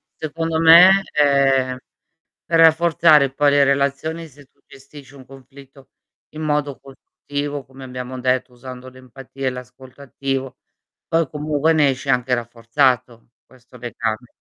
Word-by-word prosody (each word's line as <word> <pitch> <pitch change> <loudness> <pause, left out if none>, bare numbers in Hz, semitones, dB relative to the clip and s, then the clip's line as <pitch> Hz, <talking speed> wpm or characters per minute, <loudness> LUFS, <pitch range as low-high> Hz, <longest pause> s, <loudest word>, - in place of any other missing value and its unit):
secondo 160 +1 -4
me, 180 +4 +7
ehm, 135 -3 +2 0.7
per 165 -1 0
rafforzare 160 -3 +4
poi 145 0 +2
le 145 0 +4
relazioni, 140 +4 -1
se 145 0 -19
tu - - -42
gestisci 140 0 -16
un 135 -2 -15
conflitto 135 +1 -17 0.4
in 155 - -10
modo 150 -2 -2
costruttivo, 145 +1 -7
come 130 0 -14
abbiamo 125 0 -8
detto, 125 0 -1
usando 130 +1 -11
l'empatia 130 +1 -9
e - - +2
l'ascolto 125 +2 -12
attivo, 135 -1 -5 0.5
poi 165 0 0
comunque 150 +1 -1
ne 150 -3 +3
esci 135 +2 -5
anche 125 0 0
rafforzato 120 0 -1 0.2
questo 125 0 -19
legame. 115 -1 -5
135 Hz, 135 wpm, -19 LUFS, 130-150 Hz, 0.7 s, me